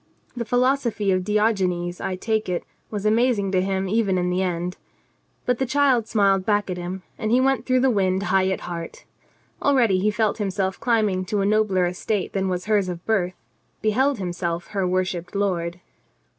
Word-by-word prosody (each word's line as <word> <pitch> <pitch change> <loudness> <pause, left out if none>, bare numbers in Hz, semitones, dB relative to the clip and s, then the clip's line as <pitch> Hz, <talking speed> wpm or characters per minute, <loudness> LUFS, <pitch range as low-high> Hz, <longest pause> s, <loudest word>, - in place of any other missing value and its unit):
The 235 -1 -3
philosophy 245 -3 +1
of 185 -1 +1
Diogenes, 185 -4 0
I 185 - -2
take 220 +1 -1
it, 180 - -1 0.3
was 210 -1 -4
amazing 220 -2 +2
to 185 -1 +2
him 190 0 -1
even 200 -2 +1
in 180 0 0
the 180 +1 0
end. 180 0 -2 0.7
But 250 -2 +1
the 265 - +1
child 260 -4 +3
smiled 195 -3 +3
back 205 -1 +1
at 180 - -3
him, 180 +1 -5 0.2
and 220 - -1
he 245 +3 +4
went 260 -2 +1
through 255 -1 +3
the 265 0 +4
wind 190 -2 +1
high 190 -1 +2
at 190 - -2
heart. 170 -1 -7 0.6
Already 240 -9 +3
he 205 +3 +2
felt 215 +1 0
himself 190 -1 -1
climbing 215 -6 +1
to 205 +2 -1
a - - +1
nobler 205 -3 +2
estate 180 +3 -2
than 190 -1 0
was 180 -1 -2
hers 205 -3 +2
of 175 -1 -6
birth, 185 -5 0 0.5
beheld 260 +6 +2
himself 175 -2 -3
her 195 -3 -1
worshipped 185 0 -2
lord. 175 -4 -1
195 Hz, 185 wpm, -23 LUFS, 185-220 Hz, 0.7 s, he